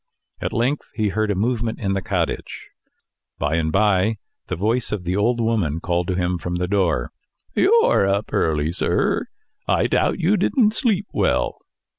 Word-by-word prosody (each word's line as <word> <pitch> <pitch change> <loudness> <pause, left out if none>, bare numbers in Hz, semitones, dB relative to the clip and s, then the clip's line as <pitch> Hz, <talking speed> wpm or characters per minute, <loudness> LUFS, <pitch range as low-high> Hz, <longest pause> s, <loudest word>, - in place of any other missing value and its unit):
At - - -2
length 125 +6 -1
he 110 -3 +1
heard 110 +1 -1
a 100 - +1
movement 115 +2 -1
in 95 -3 -1
the 95 - -1
cottage. - - -3 0.7
By 75 +2 0
and 80 -1 0
by 105 +2 +2 0.3
the - - -2
voice 110 +7 0
of 105 -4 -3
the 90 +1 -1
old 120 +4 +1
woman 105 -10 0
called 85 0 -1
to 95 - -1
him 90 0 -1
from 90 +1 -4
the 90 0 -1
door. 90 -10 0 0.4
"You're 440 - +4
up 100 +2 -1
early, 75 -1 +1
sir. 85 - 0 0.4
I - - +2
doubt - - +1
you 195 +6 +2
didn't 215 +3 +2
sleep 215 -4 +1
well." - - 0
100 Hz, 170 wpm, -22 LUFS, 90-115 Hz, 0.7 s, You're